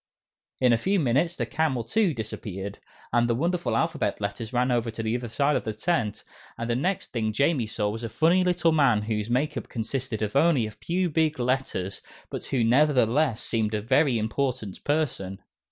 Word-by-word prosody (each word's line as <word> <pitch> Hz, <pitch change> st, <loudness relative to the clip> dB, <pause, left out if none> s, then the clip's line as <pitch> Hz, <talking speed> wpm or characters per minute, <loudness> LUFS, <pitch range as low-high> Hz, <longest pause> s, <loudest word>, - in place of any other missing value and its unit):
In 125 Hz, -2 st, +4 dB
a 115 Hz, -, +2 dB
few 195 Hz, +8 st, +1 dB
minutes, 150 Hz, +5 st, +1 dB
the -, -, -1 dB
camel, 150 Hz, -6 st, 0 dB
too, 185 Hz, -, +2 dB
disappeared, 100 Hz, -3 st, -6 dB, 0.3 s
and 120 Hz, 0 st, +3 dB
the 115 Hz, -, +2 dB
wonderful 170 Hz, +6 st, 0 dB
Alphabet 165 Hz, -2 st, 0 dB
Letters 105 Hz, +2 st, -4 dB
ran 125 Hz, +1 st, +1 dB
over 120 Hz, -1 st, +1 dB
to 115 Hz, 0 st, -5 dB
the 110 Hz, +1 st, 0 dB
other 120 Hz, -1 st, -3 dB
side 140 Hz, +6 st, +1 dB
of -, -, 0 dB
the 110 Hz, -, -4 dB
tent, 115 Hz, -5 st, -1 dB, 0.3 s
and 115 Hz, -, -3 dB
the 120 Hz, -, +1 dB
next 180 Hz, +9 st, -1 dB
thing 110 Hz, -3 st, -1 dB
Jamie 140 Hz, 0 st, +1 dB
saw 105 Hz, -1 st, -1 dB
was 110 Hz, +3 st, -4 dB
a 115 Hz, -, -3 dB
funny 170 Hz, +9 st, +3 dB
little 175 Hz, -2 st, +2 dB
man 135 Hz, -9 st, +3 dB
whose 105 Hz, 0 st, -2 dB
make 130 Hz, +5 st, 0 dB
up -, -, -6 dB
consisted 115 Hz, 0 st, -3 dB
of 105 Hz, +3 st, -3 dB
only 140 Hz, -5 st, +4 dB
a 110 Hz, -, -5 dB
few 175 Hz, -, -1 dB
big 155 Hz, -1 st, +1 dB
letters, 125 Hz, -7 st, -1 dB, 0.3 s
but -, -, -5 dB
who 130 Hz, -4 st, 0 dB
nevertheless 125 Hz, 0 st, +3 dB
seemed 110 Hz, -2 st, 0 dB
a -, -, 0 dB
very 130 Hz, +1 st, +3 dB
important 110 Hz, -2 st, -2 dB
person. 125 Hz, -11 st, -1 dB
125 Hz, 195 wpm, -26 LUFS, 110-150 Hz, 0.3 s, In